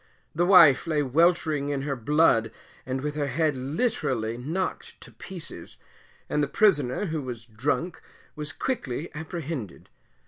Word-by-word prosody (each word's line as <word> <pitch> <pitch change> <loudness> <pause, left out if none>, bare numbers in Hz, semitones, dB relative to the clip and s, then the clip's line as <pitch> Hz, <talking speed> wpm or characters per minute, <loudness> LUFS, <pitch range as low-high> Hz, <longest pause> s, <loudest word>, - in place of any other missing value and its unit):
The 175 +2 +1
wife 170 -6 +7
lay 150 -2 +1
weltering 155 0 +2
in 140 -1 -2
her 140 -1 -2
blood 120 -3 +3 0.4
and 130 0 -2
with 150 +1 -3
her 150 -1 -2
head 155 0 +1
literally 130 - -1
knocked 160 +10 -4
to - - -13
pieces, 170 - -9 0.5
and 150 - 0
the 145 - +1
prisoner, 150 - +2
who 160 -4 -2
was 120 -4 -7
drunk, 140 +9 -2 0.3
was 150 -1 -5
quickly 150 - -3
apprehended. 155 - -6
150 Hz, 140 wpm, -26 LUFS, 130-165 Hz, 0.5 s, wife